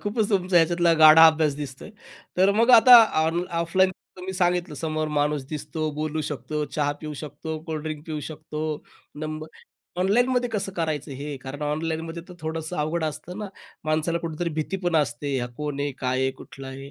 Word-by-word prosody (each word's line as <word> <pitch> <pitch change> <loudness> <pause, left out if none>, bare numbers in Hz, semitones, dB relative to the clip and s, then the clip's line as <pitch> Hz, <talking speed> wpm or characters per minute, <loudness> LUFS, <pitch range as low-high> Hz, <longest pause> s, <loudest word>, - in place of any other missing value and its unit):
खूपच 210 +1 -1
तुमचा 185 -3 +3
याच्यातला 170 +1 +3
गाढा 155 +1 +10
अभ्यास 155 -2 +3
दिसतो 135 -3 -7
आहे. 220 - -11 0.4
तर 190 +2 +5
मग 230 +4 +4
आता 245 +1 +10 0.3
ऑन 170 +2 0 0.2
ऑफलाईन 185 +3 +2 0.3
तुम्ही 180 0 -9
मी 190 - -3
सांगितलं 180 -2 0
समोर 155 +1 -2
माणूस 150 -1 0
दिसतो, 155 +1 -3
बोलू 155 +1 -2
शकतो, 150 +1 -3
चहा 145 0 -1
पिऊ 155 -1 -6
शकतो, 150 +2 -6
कोल्डड्रिंक 155 -1 -5
पिऊ 155 -2 -4
शकतो, 155 0 -7 0.6
नंबर 155 0 -5 0.5
ऑनलाईनमध्ये 245 +6 +2
कसं 200 -2 -2
करायचं 155 -3 -2
हे 145 0 -5
कारण 140 +2 -7
ऑनलाईनमध्ये 160 +2 -3
तर 180 - -10
थोडंसं 160 +2 -4
अवघड 155 +2 -1
असतं 155 +5 -5
ना 210 -2 -5 0.4
माणसाला 155 +2 0
कुठेतरी 165 +1 -3
भीती 155 +5 -2
पण 175 -2 +2
असते 140 -1 0
हा 120 - -2
कोण 150 -1 -4
आहे, 145 -1 -1
काय 130 0 -1
आहे, 130 - +1
कुठलं 135 0 -10
आहे? 135 +1 -9
155 Hz, 180 wpm, -25 LUFS, 150-175 Hz, 0.6 s, गाढा